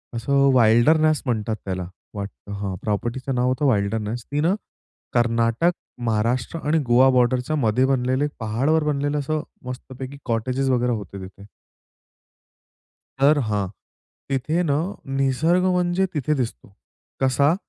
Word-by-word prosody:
असं 140 Hz, +3 st, +2 dB
"विल्डरनेस" 150 Hz, +8 st, +4 dB
म्हणतात 110 Hz, -3 st, -1 dB
त्याला 95 Hz, -2 st, -3 dB, 0.3 s
वा 100 Hz, -, -3 dB, 0.3 s
हां, 100 Hz, -2 st, -3 dB
प्रॉपर्टीचं 120 Hz, +5 st, -2 dB
नाव 125 Hz, +1 st, +1 dB
होतं 135 Hz, +1 st, +2 dB
"विल्डरनेस" 105 Hz, +3 st, -2 dB
ती 145 Hz, -, 0 dB
ना, 175 Hz, +5 st, +2 dB, 0.6 s
कर्नाटक, 115 Hz, +6 st, +2 dB, 0.3 s
महाराष्ट्र 120 Hz, +7 st, 0 dB
आणि 160 Hz, +1 st, +3 dB
गोवा 130 Hz, +2 st, +6 dB
बॉर्डरच्या 125 Hz, +3 st, +2 dB
मध्ये 125 Hz, -2 st, +2 dB
बनलेले 130 Hz, +2 st, +1 dB
पहाडावर 130 Hz, +9 st, +1 dB
बनलेलं 145 Hz, 0 st, 0 dB
असं 155 Hz, +2 st, -1 dB, 0.2 s
मस्तपैकी 130 Hz, +2 st, -7 dB
कॉटेजेस 130 Hz, +4 st, 0 dB
वगैरे 125 Hz, -1 st, +2 dB
होते 100 Hz, -2 st, -6 dB
तिथे. 95 Hz, +1 st, -12 dB, 1.8 s
तर 145 Hz, +2 st, +5 dB
हां, 105 Hz, -2 st, 0 dB, 0.6 s
तिथे 150 Hz, +6 st, 0 dB
ना, 145 Hz, -4 st, +1 dB, 0.4 s
निसर्ग 160 Hz, +7 st, +2 dB
म्हणजे 180 Hz, 0 st, +2 dB
तिथे 150 Hz, 0 st, 0 dB
दिसतो. 120 Hz, -6 st, -4 dB, 0.5 s
कसा? 140 Hz, +4 st, +3 dB
130 Hz, 120 wpm, -23 LUFS, 115-145 Hz, 1.8 s, गोवा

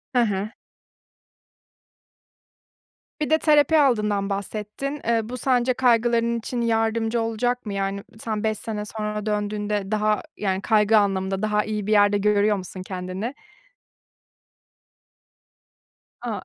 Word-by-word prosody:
Hı 245 Hz, -, +5 dB
hı. 205 Hz, -2 st, 0 dB, 2.7 s
Bir 300 Hz, -, 0 dB
de 315 Hz, -, +5 dB
terapi 305 Hz, 0 st, +4 dB
aldığından 210 Hz, -7 st, +2 dB
bahsettin. 210 Hz, +8 st, -4 dB
Iıı, 225 Hz, -1 st, +1 dB
bu 250 Hz, -, -5 dB
sence 255 Hz, -1 st, +2 dB
kaygıların 235 Hz, -1 st, +2 dB
için 235 Hz, +2 st, -4 dB
yardımcı 225 Hz, 0 st, +1 dB
olacak 245 Hz, +2 st, -1 dB
mı? 205 Hz, -, -4 dB
Yani 195 Hz, 0 st, -2 dB, 0.2 s
sen 215 Hz, -2 st, -3 dB
5 215 Hz, -1 st, 0 dB
sene 210 Hz, -2 st, -5 dB
sonra 210 Hz, 0 st, -4 dB
döndüğünde 210 Hz, -1 st, -2 dB
daha 215 Hz, 0 st, +1 dB, 0.2 s
yani 190 Hz, -1 st, -1 dB
kaygı 215 Hz, +1 st, +4 dB
anlamında 195 Hz, -1 st, 0 dB
daha 210 Hz, -1 st, +1 dB
iyi 210 Hz, -1 st, -4 dB
bir -, -, 0 dB
yerde 205 Hz, -1 st, +5 dB
görüyor 210 Hz, +1 st, +3 dB
musun 185 Hz, 0 st, -7 dB
kendini? 185 Hz, +6 st, -4 dB, 2.9 s
A. -, -, -4 dB
215 Hz, 120 wpm, -24 LUFS, 205-235 Hz, 2.9 s, Hı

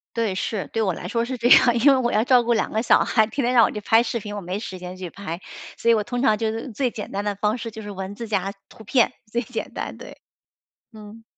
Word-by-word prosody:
对， 225 Hz, -4 st, 0 dB
是， 195 Hz, +1 st, -3 dB
对 225 Hz, -, 0 dB
我 190 Hz, -4 st, +1 dB
来 175 Hz, -, -7 dB
说 230 Hz, +4 st, 0 dB
是 255 Hz, +1 st, -4 dB
这 240 Hz, +1 st, +1 dB
样， 240 Hz, -2 st, +7 dB
因 280 Hz, +5 st, +6 dB
为 -, -, +3 dB
我 240 Hz, -2 st, 0 dB
要 215 Hz, -, +2 dB
照 250 Hz, -1 st, +4 dB
顾 235 Hz, 0 st, +2 dB
2 220 Hz, -, 0 dB
个 220 Hz, -, 0 dB
小 235 Hz, -, +4 dB
孩， 220 Hz, -2 st, +2 dB
天 270 Hz, +1 st, -2 dB
天 250 Hz, -, +1 dB
让 235 Hz, -, +7 dB
我 -, -, -2 dB
去 210 Hz, -, -5 dB
拍 225 Hz, +2 st, +4 dB
视 235 Hz, 0 st, -2 dB
频， 210 Hz, 0 st, -7 dB
我 205 Hz, -, -5 dB
没 180 Hz, +1 st, -4 dB
时 190 Hz, -4 st, -7 dB
间 180 Hz, +1 st, -8 dB
去 185 Hz, -2 st, -6 dB
拍。 180 Hz, -4 st, -6 dB, 0.4 s
所 235 Hz, -, +3 dB
以 -, -, +6 dB
我 215 Hz, -2 st, +1 dB
通 245 Hz, +3 st, -3 dB
常 215 Hz, -5 st, +4 dB
就 220 Hz, -1 st, -1 dB
是 230 Hz, +3 st, -6 dB
最 250 Hz, +3 st, 0 dB
简 215 Hz, -, -7 dB
单 200 Hz, +1 st, -3 dB
的 205 Hz, -1 st, -2 dB
方 210 Hz, +3 st, 0 dB
式， 230 Hz, -1 st, -5 dB
就 220 Hz, 0 st, -9 dB
是 205 Hz, -, -7 dB
文 195 Hz, +1 st, -6 dB
字 230 Hz, 0 st, -6 dB
加 195 Hz, -2 st, -1 dB, 0.2 s
图 220 Hz, -, -14 dB
片， 245 Hz, +2 st, +2 dB, 0.2 s
最 240 Hz, -, 0 dB
简 235 Hz, -, -6 dB
单， -, -, -5 dB
对。 -, -, -11 dB, 0.7 s
嗯。 220 Hz, 0 st, -12 dB
220 Hz, 300 characters per minute, -23 LUFS, 205-235 Hz, 0.7 s, 样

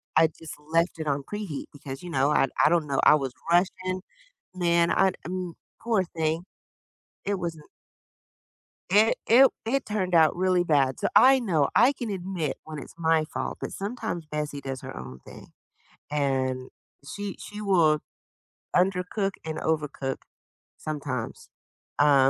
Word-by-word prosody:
I 160 Hz, -, +7 dB
just 160 Hz, 0 st, -11 dB, 0.2 s
left 165 Hz, +1 st, +2 dB
it 155 Hz, -, -3 dB
on 140 Hz, -1 st, 0 dB
preheat 205 Hz, -7 st, -5 dB
because, 135 Hz, -1 st, -8 dB
you 175 Hz, -, -8 dB
know, 140 Hz, -1 st, +2 dB
I 135 Hz, -, +3 dB, 0.2 s
I -, -, +6 dB
don't 165 Hz, -3 st, +2 dB
know, 135 Hz, -, 0 dB
I -, -, +8 dB
was 135 Hz, -4 st, -2 dB, 0.2 s
rushing, 185 Hz, +1 st, +1 dB, 0.5 s
man, 170 Hz, -1 st, +2 dB
I, 190 Hz, -1 st, +3 dB
m 180 Hz, 0 st, -4 dB, 0.3 s
poor 220 Hz, -5 st, +1 dB
thing, 160 Hz, 0 st, -2 dB, 0.8 s
it 200 Hz, 0 st, -1 dB
wasn't 165 Hz, -4 st, -5 dB, 1.3 s
It 215 Hz, +3 st, +5 dB
it 235 Hz, +4 st, +6 dB
w 270 Hz, -, +8 dB, 0.2 s
it 260 Hz, +4 st, 0 dB
turned 190 Hz, -4 st, -2 dB
out 160 Hz, -1 st, +5 dB
really 185 Hz, 0 st, +2 dB
bad. 140 Hz, -6 st, +2 dB
So, -, -, +1 dB
I 265 Hz, 0 st, +7 dB
know, 165 Hz, -, +1 dB
I 250 Hz, +5 st, +6 dB
can 240 Hz, -4 st, -5 dB
admit 180 Hz, -6 st, -3 dB
when 155 Hz, -1 st, -7 dB
it's -, -, -10 dB
my 160 Hz, -1 st, +2 dB
fault, 155 Hz, -, -5 dB
but -, -, -5 dB
sometimes 195 Hz, -6 st, -4 dB
Bessie 150 Hz, -1 st, -3 dB
does 135 Hz, -2 st, -5 dB
her -, -, -8 dB
own 65 Hz, 0 st, -8 dB
thing -, -, -12 dB, 0.6 s
and 130 Hz, -3 st, 0 dB, 0.4 s
she 205 Hz, +3 st, -5 dB
she 210 Hz, 0 st, -8 dB
will 170 Hz, -7 st, +3 dB, 0.8 s
undercook 190 Hz, +2 st, +1 dB
and 160 Hz, 0 st, -4 dB
overcook 150 Hz, -4 st, -2 dB, 0.6 s
sometimes, 140 Hz, -6 st, -5 dB, 0.5 s
um, 140 Hz, -2 st, +6 dB
165 Hz, 155 wpm, -26 LUFS, 145-190 Hz, 1.3 s, I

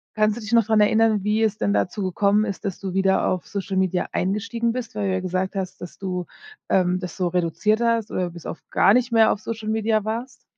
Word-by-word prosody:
Kannst 215 Hz, 0 st, +2 dB
du -, -, -6 dB
dich 215 Hz, +2 st, -7 dB
noch 230 Hz, -1 st, +6 dB
daran 220 Hz, -1 st, +3 dB
erinnern, 215 Hz, -1 st, +3 dB
wie 215 Hz, +2 st, +1 dB
es 215 Hz, -1 st, +1 dB
denn 100 Hz, -, 0 dB
dazu 105 Hz, -, -1 dB
gekommen 200 Hz, +3 st, +2 dB
ist, 200 Hz, 0 st, -5 dB
dass 195 Hz, -, -3 dB
du 190 Hz, -2 st, -5 dB
wieder 190 Hz, 0 st, +2 dB
auf 185 Hz, -, -1 dB
Social 195 Hz, -1 st, -3 dB
Media 185 Hz, -1 st, +1 dB
eingestiegen 225 Hz, +5 st, -1 dB
bist? 235 Hz, -3 st, -5 dB
Weil 205 Hz, -2 st, -1 dB
du -, -, 0 dB
ja 190 Hz, -, 0 dB
gesagt 185 Hz, +2 st, -2 dB
hast, 190 Hz, -2 st, -4 dB
dass 175 Hz, -, -9 dB
du, 180 Hz, -2 st, -3 dB, 0.4 s
ähm, 180 Hz, -1 st, +2 dB
das 180 Hz, -3 st, -6 dB
so 180 Hz, -2 st, 0 dB
reduziert 180 Hz, +6 st, 0 dB
hast 230 Hz, -2 st, +1 dB
oder 180 Hz, -2 st, -2 dB
bis 170 Hz, -1 st, -12 dB
auf -, -, -6 dB
gar 200 Hz, -, +5 dB
nicht 250 Hz, 0 st, +2 dB
mehr 225 Hz, -1 st, +5 dB
auf 200 Hz, -, -2 dB
Social 220 Hz, -1 st, -5 dB
Media 220 Hz, -1 st, +1 dB
warst? 235 Hz, +4 st, -5 dB
205 Hz, 240 wpm, -23 LUFS, 185-220 Hz, 0.4 s, noch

